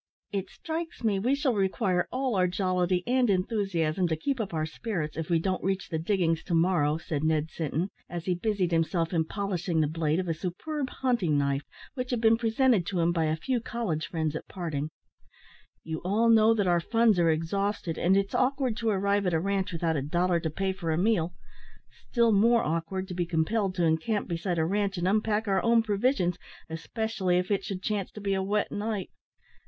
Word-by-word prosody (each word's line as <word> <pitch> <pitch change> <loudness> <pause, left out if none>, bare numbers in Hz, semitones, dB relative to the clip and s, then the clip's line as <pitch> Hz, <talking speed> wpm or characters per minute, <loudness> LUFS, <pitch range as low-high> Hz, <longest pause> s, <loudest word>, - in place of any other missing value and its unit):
"It 195 -2 -3
strikes 325 -3 -5
me 205 -4 +2
we 250 +7 +2
shall 280 -3 +1
require 190 -2 +1
all 260 -3 -1
our 185 -1 +3
jollity 180 -1 0
and 250 -1 +2
enthusiasm 185 -4 0
to 160 - 0
keep 260 - -2
up 205 - -4
our 155 -2 -1
spirits, 165 -2 -4
if 160 -1 -4
we 170 - +4
don't 185 +3 -1
reach 190 0 -1
the 160 - -2
diggings 165 -2 +1
to 175 - 0
morrow," 165 -3 +2
said 155 -2 -3
Ned 155 0 +1
Sinton, 165 +4 -2 0.2
as 170 -1 -5
he 185 - +1
busied 185 -1 0
himself 165 +1 +1
in 160 -2 +2
polishing 180 -3 -2
the 155 - +3
blade 155 +1 0
of 185 - -2
a 165 - +1
superb 260 - -4
hunting 235 - 0
knife, 140 -1 +1 0.3
which 250 -2 -4
had 245 - 0
been 225 0 +5
presented 230 -2 +2
to 185 - -1
him 170 +1 +3
by 165 -2 +1
a 155 0 +1
few 245 +10 -1
college 215 -10 -3
friends 160 -2 -2
at - - -6
parting; 155 -5 -4 0.9
"you 160 0 -4
all 215 +6 +2
know 225 0 +6
that 205 -3 +1
our 175 -1 +3
funds 225 +1 +3
are 170 -1 +4
exhausted, 165 +2 -1
and 185 +3 +3
it's 200 0 0
awkward 260 -2 +1
to 230 0 0
arrive 200 -1 +1
at 175 - +1
a - - +2
ranche 195 +1 -1
without 165 -1 0
a 140 - 0
dollar 175 +5 +1
to 160 - -2
pay 190 +5 -1
for 180 -3 -5
a 160 - +1
meal 180 -3 +1 0.7
still 235 -2 +3
more 230 +3 +4
awkward 165 +4 -2
to 185 - -6
be 175 -1 -1
compelled 185 +4 0
to 175 -2 +1
encamp 165 +7 0
beside 175 +1 -2
a 160 - +2
ranche 200 +2 0
and 175 +1 0
unpack 215 +2 +1
our 195 -1 +2
own 230 -1 +4
provisions, 205 -3 +1 0.3
especially 185 +2 -1
if 180 +3 -1
it 200 - +1
should 190 -3 -5
chance 205 -3 -1
to - - -10
be 200 -1 -1
a 190 - 0
wet 205 +2 0
night. 205 -2 -3
185 Hz, 210 wpm, -28 LUFS, 165-215 Hz, 0.9 s, know